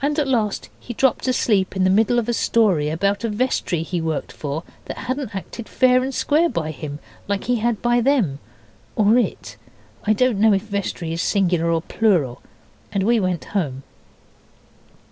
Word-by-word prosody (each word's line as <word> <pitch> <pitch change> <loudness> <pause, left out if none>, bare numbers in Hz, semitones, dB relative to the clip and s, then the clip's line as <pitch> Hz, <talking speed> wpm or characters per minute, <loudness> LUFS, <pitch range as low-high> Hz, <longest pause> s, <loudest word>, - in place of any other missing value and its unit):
At 295 0 +1
last 220 -6 -1
he 240 - -8
dropped 265 +1 +1
asleep 210 -7 +1
in 190 - +1
the 185 - +4
middle 225 +4 +3
of 240 -2 0
a 240 - 0
story 195 -11 +2
about 200 +6 0
a 230 - 0
vestry 210 -7 -1
he 175 +1 -3
worked 160 -2 -3
for 150 +2 -5 0.2
that - - -6
hadn't 255 -4 -4
acted 215 +4 -7
fair 255 -1 +4
and 265 +1 -2
square 310 +5 +2
by 160 - -2
him 145 0 -6 0.3
like 200 -1 -1
he 245 0 +1
had 230 0 -1
by 240 0 +3
them, 225 - +1 0.6
or 215 +3 +4
it - - -3 0.5
(I 215 - +3
don't 245 -2 +1
know 220 0 +5
if 195 - 0
vestry 200 -5 -3
is 165 - -2
singular 180 -5 +1
or 165 -1 +1
plural), 175 - +1 0.5
and 195 -2 0
we 230 +3 +3
went 185 -3 -1
home. 140 -9 -2
205 Hz, 180 wpm, -21 LUFS, 170-240 Hz, 0.6 s, know